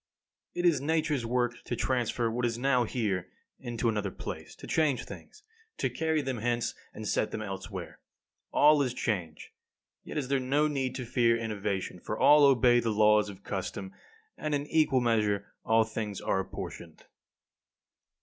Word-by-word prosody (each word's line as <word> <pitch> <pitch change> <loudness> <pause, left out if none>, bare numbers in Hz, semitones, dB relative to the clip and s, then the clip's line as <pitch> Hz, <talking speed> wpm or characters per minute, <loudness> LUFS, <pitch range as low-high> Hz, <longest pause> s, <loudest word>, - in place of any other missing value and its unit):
6. - - -4
It 175 - +4
is 150 -6 +3
Nature's 150 -4 0
work 120 0 -1
to 120 - -3
transfer 120 -2 0
what 120 +2 -2
is 115 -1 0
now 125 -1 +2
here 100 -7 -1 0.3
into 120 -2 -2
another 105 -3 0
place, - - -7
to - - -11
change 145 -7 +1
things, 425 - -12 0.3
to - - -1
carry 160 -2 0
them 130 -3 -3
hence, 120 +1 -1 0.2
and 110 - -7
set 105 - +1
them 110 - -4
elsewhere. 95 -2 -7 0.5
All 150 0 +5
is 125 -3 -1
change, 90 -11 -3 0.5
yet - - -7
is 140 -4 -1
there 140 0 +1
no 140 +4 +2
need 135 -4 -2
to 130 -2 -4
fear 115 0 +3
innovation, 100 -5 -3
for 110 - -4
all 150 -1 +7
obey 125 -3 +5
the 115 - -1
laws 105 -1 +4
of 100 -1 -11
custom, 95 0 -5 0.5
and 155 -1 -1
in 145 0 -2
equal 150 -4 +2
measure 105 -4 +1 0.2
all 110 0 +4
things 110 -2 -4
are 95 - 0
apportioned. 95 - -7
120 Hz, 170 wpm, -29 LUFS, 105-135 Hz, 0.5 s, all